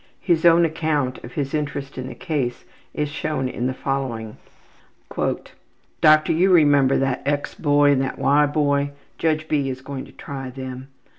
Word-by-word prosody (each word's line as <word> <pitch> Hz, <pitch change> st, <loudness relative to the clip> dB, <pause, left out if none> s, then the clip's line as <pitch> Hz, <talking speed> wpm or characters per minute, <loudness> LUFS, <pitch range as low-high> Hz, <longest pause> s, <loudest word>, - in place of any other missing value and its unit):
His 170 Hz, -3 st, +1 dB
own 170 Hz, 0 st, +6 dB
account 155 Hz, -5 st, -1 dB
of 120 Hz, -, -10 dB
his 140 Hz, -3 st, -3 dB
interest 145 Hz, -2 st, -3 dB
in 130 Hz, 0 st, -5 dB
the 130 Hz, -, -8 dB
case 140 Hz, -9 st, -3 dB, 0.3 s
is 150 Hz, -, -2 dB
shown 145 Hz, -2 st, -2 dB
in 125 Hz, 0 st, -2 dB
the 130 Hz, -, -1 dB
following: 125 Hz, -6 st, -3 dB, 0.7 s
``Doctor, 155 Hz, 0 st, 0 dB
you 185 Hz, +4 st, +3 dB
remember 145 Hz, -5 st, +5 dB
that 135 Hz, -1 st, 0 dB
X. 145 Hz, 0 st, -1 dB
boy 145 Hz, -1 st, +3 dB
and 135 Hz, -2 st, +2 dB
that 135 Hz, -, -3 dB
Y. 145 Hz, +1 st, +3 dB
boy. 145 Hz, -1 st, 0 dB, 0.3 s
Judge 155 Hz, -1 st, 0 dB
B. 145 Hz, -3 st, 0 dB
is 130 Hz, 0 st, -5 dB
going 135 Hz, 0 st, -6 dB
to -, -, -15 dB
try 135 Hz, -2 st, -7 dB
them. 130 Hz, 0 st, -7 dB
140 Hz, 165 wpm, -22 LUFS, 130-155 Hz, 0.7 s, own